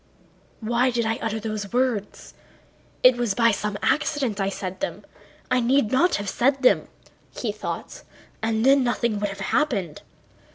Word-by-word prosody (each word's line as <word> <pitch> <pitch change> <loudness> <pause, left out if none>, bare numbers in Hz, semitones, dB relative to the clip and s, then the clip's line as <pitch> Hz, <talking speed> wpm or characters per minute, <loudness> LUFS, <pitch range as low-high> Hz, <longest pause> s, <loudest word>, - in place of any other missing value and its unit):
"Why 240 +3 +1
did 235 -2 -1
I 225 0 -1
utter 220 0 -2
those 215 -2 -5
words? 245 -5 -2 0.7
It 255 -1 +7
was 235 -5 0
by 230 -1 +4
some 210 0 -3
accident 270 -8 0
I 195 - +1
said 185 -1 -6
them.... 290 - -4 0.5
I 255 - +4
need 245 -1 +2
not 335 +8 +3
have 205 - -4
said 270 +6 +1
them," 255 - +4 0.5
he 230 - -2
thought. 210 - -6 0.4
"And 220 +1 0
then 275 0 +5
nothing 235 -3 0
would 205 0 -1
have 195 - -8
happened." 200 - -1
230 Hz, 160 wpm, -24 LUFS, 210-255 Hz, 0.7 s, It